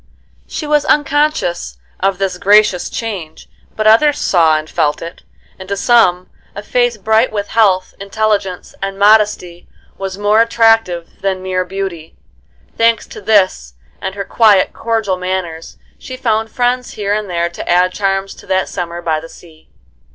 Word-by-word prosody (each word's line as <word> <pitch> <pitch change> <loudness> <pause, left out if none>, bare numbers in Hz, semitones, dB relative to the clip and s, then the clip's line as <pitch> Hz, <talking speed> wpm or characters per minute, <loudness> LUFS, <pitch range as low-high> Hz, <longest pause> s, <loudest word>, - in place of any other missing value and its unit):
She 310 - -5
was 295 -1 +2
unconscious 290 - 0 0.2
of 195 0 0
this 190 -2 -2
gracious 205 -3 +3
change, 190 -9 -6 0.3
but 215 - -2
others 280 +7 +5
saw 160 -4 +3
and 155 0 -6
felt 150 -1 0
it, 170 +1 -9 0.4
and 190 0 -10
to 200 - -2
some 185 -6 +3 0.3
a 205 - -7
face 245 +1 0
bright 220 +4 +2
with 205 -1 -4
health, 195 -5 +2
intelligence, 200 -2 -2
and 195 0 -4
modesty 205 -4 +2 0.3
was 195 -1 -5
more 205 +2 +3
attractive 225 -7 +1
than 190 -1 -2
mere 185 -1 -1
beauty. 180 -4 -6 0.6
Thanks 230 -1 +2
to - - -10
this 185 - +1 0.3
and 190 0 -4
her 200 -1 -4
quiet, 210 -4 +3
cordial 220 -5 -1
manners, 180 -3 -5 0.2
she 255 - -8
found 225 -3 0
friends 250 +1 -1
here 205 -1 -2
and 210 -1 -3
there 170 -1 -1
to 175 - -8
add 180 +1 +3
charms 195 -1 -1
to - - -16
that 190 0 0
summer 175 -1 -5
by 160 -2 0
the 165 +1 -11
sea. 160 -2 -17
195 Hz, 160 wpm, -15 LUFS, 180-220 Hz, 0.6 s, others